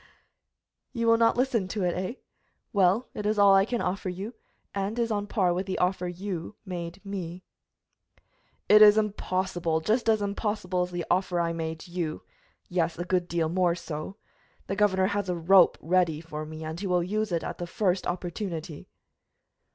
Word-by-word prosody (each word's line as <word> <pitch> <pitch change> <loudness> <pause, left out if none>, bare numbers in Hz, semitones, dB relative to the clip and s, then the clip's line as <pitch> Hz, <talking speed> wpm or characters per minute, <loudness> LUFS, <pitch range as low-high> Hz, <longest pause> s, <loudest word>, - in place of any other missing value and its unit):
"You 230 -2 -1
will 230 0 +5
not 230 +1 +4
listen 245 -6 +1
to 205 0 -3
it, 175 -1 +1
eh! 185 +6 -3 0.6
Well, 200 +4 +3
it 210 - -3
is 215 0 +1
all 200 -1 +7
I 195 0 +5
can 240 +1 -2
offer 190 +1 -2
you, 195 +6 -5 0.4
and 200 +3 -2
is 235 -1 0
on 205 -1 -1
a - - -16
par 185 -5 +1
with 185 +2 -3
the 190 - -2
offer 180 0 0
you 180 +1 -5
made 180 +1 -6
me." 185 -2 -5 1.2
"It 210 +1 +7
is 210 0 +9
impossible, 185 -5 0
just 220 +8 +1
as 220 -1 +4
impossible 200 -2 -1
as 180 - -1
the 175 -1 -4
offer 180 -1 +1
I 170 -1 0
made 160 0 -5
you 170 -3 -4 0.4
yes, 175 -2 -1
a 175 - -3
good 180 -1 0
deal 170 -2 0
more 175 0 +2
so. 170 +2 -6 0.5
The 195 - -3
governor 190 -2 +3
has 205 -1 -1
a 180 - 0
rope 175 +2 +5
ready 170 -2 +1
for 155 -1 -7
me, 155 0 -8
and 160 +1 -5
he 200 - -3
will 180 -1 +2
use 215 +3 -1
it 170 -1 0
at - - -5
the 175 - -4
first 185 0 0
opportunity." 175 -3 -5
185 Hz, 185 wpm, -27 LUFS, 175-205 Hz, 1.2 s, is